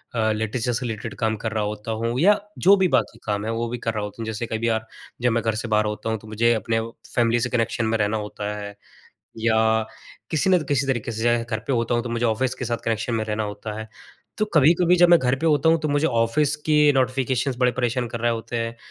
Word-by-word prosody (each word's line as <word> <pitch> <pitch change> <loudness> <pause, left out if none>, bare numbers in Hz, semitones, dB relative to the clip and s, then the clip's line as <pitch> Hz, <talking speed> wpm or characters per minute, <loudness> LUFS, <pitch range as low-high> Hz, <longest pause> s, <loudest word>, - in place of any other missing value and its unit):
अ, 110 -1 +2
literature 110 +3 -1
से 125 +2 -2
related 110 -3 -5
काम 110 -2 +1
कर 110 - -1
रहा 110 -1 -1
होता 105 +1 -4
हूँ 115 +2 -1
या 205 +6 +5 0.3
जो 195 - +8
भी 190 -1 +3
बाकी 115 - 0
काम 105 -1 -2
है, 110 - -1
वो 115 +1 -2
भी 120 - -3
कर 115 -1 -3
रहा 105 -1 -3
होता 105 +2 -7
हूँ - - -3
जैसे 110 +1 -3
कभी 110 +1 -2
अ, 110 -1 +2 0.4
जब 125 -1 +2
मैं 115 0 0
घर 110 -1 0
से 110 +2 -4
बाहर 110 -1 +2
होता 105 +1 -3
हूँ 110 - 0
तो 110 - -15
मुझे 115 +2 +2
अपने 115 +1 0 0.4
फैमिली 120 0 +3
से 125 +1 -1
कनेक्शन 115 -1 0
में 110 0 +1
रहना 105 +1 0
होता 105 0 -5
है 100 0 -7 0.6
या 110 0 +2 0.7
किसी 160 +4 +1
न 185 - +5
किसी 140 -1 +1
तरीके 120 -3 -1
से 120 +2 +2
घर 115 -2 -3
पे - - 0
होता 115 -1 0
हूँ 120 - +1
तो 120 - -5
मुझे 115 +1 -1
ऑफ़िस 125 +3 0
के 130 - -5
साथ 120 0 -1
कनेक्शन 115 +1 -1
में 110 -1 -1
रहना 110 0 -2
होता 105 +1 -6
है। 110 0 -7 0.5
तो 215 - +2
कभी-कभी 165 +4 +5
जब 175 0 +6
मैं 175 -1 +7
घर 125 +1 +1
पे 165 - -1
होता 150 0 +3
हूँ 165 - +5
तो 155 - -1
मुझे 145 +2 +2
ऑफ़िस 125 +5 +1
के 150 -1 +5
नोटिफ़िकेशंस 130 0 0
बड़े 125 -1 +3
परेशान 120 0 -1
कर 115 +1 -6
रहे 120 0 +2
होते 115 +1 -5
हैं, 115 0 -3
115 Hz, 255 wpm, -23 LUFS, 110-130 Hz, 0.7 s, जो